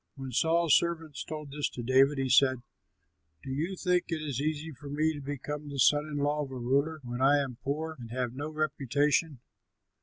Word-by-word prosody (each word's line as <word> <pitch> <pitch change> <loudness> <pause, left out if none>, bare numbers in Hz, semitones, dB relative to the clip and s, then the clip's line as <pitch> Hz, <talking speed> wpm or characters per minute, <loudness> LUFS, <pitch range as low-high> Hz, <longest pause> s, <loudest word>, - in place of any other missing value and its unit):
'" - - -52
When 135 -2 -7
Saul's 165 +4 +3
servants 165 -3 -1
told 150 -2 -7
this 145 0 -1
to 120 - -7
David, 135 +4 +4
he 135 0 0
said, 130 -1 +4 0.8
"Do 135 - -6
you 160 +8 -2
think 180 -1 +1
it 165 - -1
easy 155 +1 -3
for 140 0 -10
me 155 +2 +1
to 145 - -7
become 145 +1 -5
the 140 - -6
son 145 +4 +4
in 150 -1 -4
law 145 +1 +1
of 140 - -7
a 135 - -7
ruler 140 +6 0
when 120 +1 -5
I 140 +2 +5
am 135 -4 -2
poor 155 +3 -3
and 115 -2 -9
have 125 0 -2
no 145 +4 -4
reputation!" 145 -1 0
145 Hz, 205 wpm, -29 LUFS, 135-155 Hz, 0.8 s, I